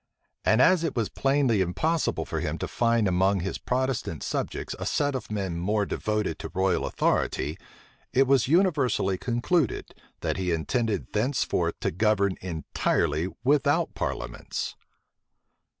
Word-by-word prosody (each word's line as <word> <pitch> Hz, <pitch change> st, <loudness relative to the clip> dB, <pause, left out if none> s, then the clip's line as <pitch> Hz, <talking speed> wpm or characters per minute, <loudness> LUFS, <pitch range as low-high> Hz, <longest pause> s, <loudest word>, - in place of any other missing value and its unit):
And 110 Hz, +4 st, +4 dB
as 180 Hz, -1 st, +4 dB
it 165 Hz, -, -1 dB
was 115 Hz, -4 st, 0 dB
plainly 135 Hz, -6 st, +2 dB
impossible 155 Hz, -, 0 dB
for -, -, -3 dB
him -, -, -2 dB
to -, -, -3 dB
find 115 Hz, -3 st, +2 dB
among 95 Hz, +1 st, +2 dB
his 95 Hz, -, -3 dB
Protestant 125 Hz, -, -2 dB
subjects -, -, -3 dB
a -, -, -4 dB
set 145 Hz, -1 st, +1 dB
of 130 Hz, -4 st, -5 dB
men 95 Hz, -5 st, -2 dB
more 105 Hz, +3 st, +1 dB
devoted 105 Hz, -6 st, -2 dB
to -, -, -6 dB
royal 95 Hz, -1 st, +1 dB
authority, 75 Hz, +5 st, 0 dB, 0.5 s
it 135 Hz, +2 st, +4 dB
was 135 Hz, -3 st, +3 dB
universally 145 Hz, -, +2 dB
concluded, 125 Hz, -, 0 dB, 0.3 s
that -, -, -1 dB
he 90 Hz, -2 st, -1 dB
intended 110 Hz, +7 st, -1 dB
thenceforth 125 Hz, +6 st, 0 dB
to -, -, 0 dB
govern 100 Hz, +1 st, +2 dB
entirely 80 Hz, -2 st, 0 dB, 0.2 s
without 145 Hz, +4 st, +2 dB
parliaments. -, -, -4 dB
110 Hz, 135 wpm, -27 LUFS, 95-135 Hz, 0.5 s, And